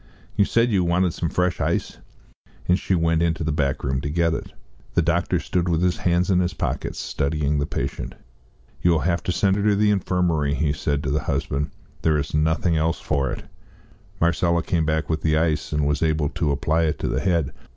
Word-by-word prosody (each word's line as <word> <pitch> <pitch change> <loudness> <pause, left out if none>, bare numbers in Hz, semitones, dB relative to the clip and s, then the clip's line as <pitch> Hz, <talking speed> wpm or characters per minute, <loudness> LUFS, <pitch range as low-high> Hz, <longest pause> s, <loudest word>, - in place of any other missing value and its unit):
You 100 -1 +4
said 115 +3 +2
you 95 -3 +2
wanted 85 0 +1
some 85 - -2
fresh 90 +1 0
ice." - - -1 0.7
And 90 +2 +3
she 95 - 0
went 80 -1 +2
into 80 -2 0
the 80 - 0
back 70 -2 -1
room 65 0 -1
to 75 - -3
get 85 +1 +1
it. - - -5 0.4
The - - +4
doctor - - +1
stood 90 -1 -1
with 85 +1 +1
his 90 -1 +2
hands 90 +1 +1
in 90 - +4
his 90 0 -1
pockets, - - -3
studying 75 0 -1
the 75 - -1
patient. - - -4 0.7
"You 90 - +3
will 80 -2 +3
have 85 -1 0
to - - -2
send 95 +2 +2
her - - 0
to 105 -1 +3
the 105 +1 +3
infirmary," 85 -7 +1
he 75 +1 +1
said 70 0 -1
to 65 - -1
the 75 - +1
husband; 70 +2 -1 0.3
"there 80 -1 +2
is 70 0 -3
nothing 80 +2 +2
else 80 +2 0
for 70 -3 0
it." - - -5 0.7
Marcella 85 0 +2
came 85 -5 0
back 80 +1 0
with 80 -1 -1
the 80 -1 +2
ice, 80 -1 0
and 75 -1 +1
was 75 0 0
able 80 -2 +1
to 85 -2 -1
apply 80 +4 +1
it 75 -2 0
to - - -3
the - - 0
head. 85 -7 0
80 Hz, 215 wpm, -23 LUFS, 75-90 Hz, 0.7 s, You